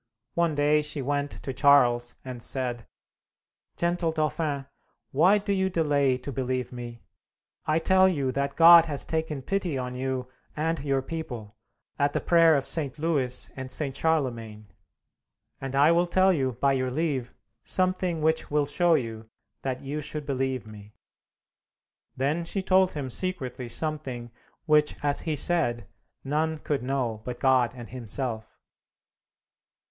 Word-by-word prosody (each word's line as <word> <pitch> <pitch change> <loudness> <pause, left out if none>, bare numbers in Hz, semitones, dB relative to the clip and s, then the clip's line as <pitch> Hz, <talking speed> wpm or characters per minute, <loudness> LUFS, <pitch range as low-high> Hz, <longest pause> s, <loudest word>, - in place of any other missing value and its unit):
One 170 -3 +1
day 150 +1 +3
she 150 -2 -2
went 145 +1 -1
to 135 - -4
Charles 125 -3 +4
and 125 -2 -7
said, 120 -2 -1 0.9
"Gentle 170 -1 0
Dauphin, 155 -3 -1 0.5
why 180 +9 +5
do 205 0 -1
you 190 -1 +1
delay 145 -6 +2
to 130 +3 -7
believe 130 -1 -2
me? 120 -1 -8 0.6
I 155 0 +2
tell 190 +3 +4
you 140 -7 -1
that 140 +2 -2
God 170 0 +9
has 145 -4 -2
taken 160 -4 -3
pity 185 -3 -1
on 125 -1 -4
you 130 0 -3 0.3
and 160 0 -1
your 135 -2 0
people, 125 -9 -6 0.4
at 145 0 +2
the - - +1
prayer 165 -2 +5
of 135 -1 0
St. 150 -4 -1
Louis 145 -6 0
and 130 -1 -5
St. 135 -1 0
Charlemagne. 115 -10 -2 0.9
And 135 0 -4
I 145 +4 +5
will 175 +1 +3
tell 190 +2 +4
you 130 -5 0
by 140 +4 +1
your 130 -1 0
leave, 135 -3 -2 0.3
something 185 -3 0
which 160 +1 +1
will 150 0 +1
show 170 +4 +3
you 115 -4 -4 0.3
that 130 -1 -4
you 145 +2 -4
should 150 0 -5
believe 130 -3 -2
me." 105 -1 -13 1.2
Then 145 +6 0
she 190 +3 -3
told 190 0 +3
him 140 -4 -4
secretly 130 -8 -3
something 130 -3 -4 0.3
which, 150 -1 +3
as 145 -1 +1
he 155 - 0
said, 135 - +1 0.4
none 155 +3 -1
could 145 -3 -2
know 125 -4 -2
but 125 +1 -6
God 130 -3 +3
and 120 -2 -10
himself. 120 -2 -5
140 Hz, 150 wpm, -27 LUFS, 125-160 Hz, 1.2 s, God